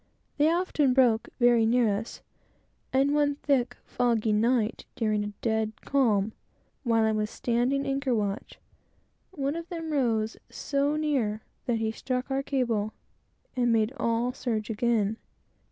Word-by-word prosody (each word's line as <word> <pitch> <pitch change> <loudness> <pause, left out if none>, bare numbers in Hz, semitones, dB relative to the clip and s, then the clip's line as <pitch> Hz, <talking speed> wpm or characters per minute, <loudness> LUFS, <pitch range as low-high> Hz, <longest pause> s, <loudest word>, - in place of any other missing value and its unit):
They 300 +2 +5
often 315 -7 +1
"broke" 240 -4 +3
very 240 -2 +5
near 225 -2 +3
us; 220 +3 -6 0.7
and 275 +2 +3
one 290 -1 +2
thick, 275 -3 0
foggy 230 -3 +1
night, 230 +1 +1
during 215 -2 0
a 205 - -4
dead 220 -1 0
calm, 220 -7 +1 0.5
while 230 -3 +3
I 220 - +3
was 215 0 -1
standing 245 +5 0
anchor 275 -2 0
watch, 205 -2 -3 0.7
one 285 -4 -2
of 335 +1 -6
them 330 -3 -5
rose 230 -6 0
so 285 +1 -1
near, 260 -9 0 0.2
that 240 -2 +1
he 220 0 -1
struck 255 +3 -3
our 270 0 +1
cable, 235 -6 -1 0.6
and 240 -2 +2
made 225 +1 +2
all 235 -1 0
surge 225 -4 -2
again. 220 -1 +1
240 Hz, 140 wpm, -28 LUFS, 220-275 Hz, 0.7 s, They